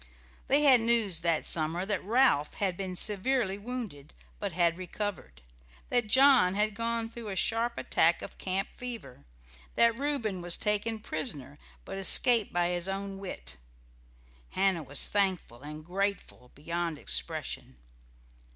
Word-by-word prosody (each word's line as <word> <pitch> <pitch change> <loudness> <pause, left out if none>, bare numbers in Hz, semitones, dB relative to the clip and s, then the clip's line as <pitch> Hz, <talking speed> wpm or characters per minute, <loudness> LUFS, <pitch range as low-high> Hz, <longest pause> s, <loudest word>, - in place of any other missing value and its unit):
They 285 +2 +3
had 260 -5 +6
news 225 -7 +2
that 165 -1 0
summer 165 +3 +1
that 205 0 -2
Ralph 215 - +2
had 190 -3 -1
been 185 0 -5
severely 210 +1 +1
wounded, 210 - -7 0.2
but 200 -2 -3
had 170 0 +1
recovered; 185 - -6 0.5
that 240 -3 +1
John 255 -6 +5
had 210 +1 +1
gone 230 +1 -2
through 230 -1 -9
a 195 - -4
sharp 230 +5 0
attack - - +2
of - - -10
camp 190 +2 -2
fever; 235 - -8 0.5
that 230 -1 +4
Reuben 235 -8 -2
was 175 -1 +1
taken 210 +1 -1
prisoner, 145 - -5 0.3
but 195 - -6
escaped 230 +3 +6
by 175 0 +1
his 175 0 -1
own 195 0 -4
wit. 180 - -6 0.9
Hannah 190 -3 +1
was 145 -1 0
thankful 190 - -1
and 150 +1 -9
grateful 190 -8 -3
beyond 165 +2 -3
expression. 65 - -2
195 Hz, 140 wpm, -29 LUFS, 170-230 Hz, 0.9 s, had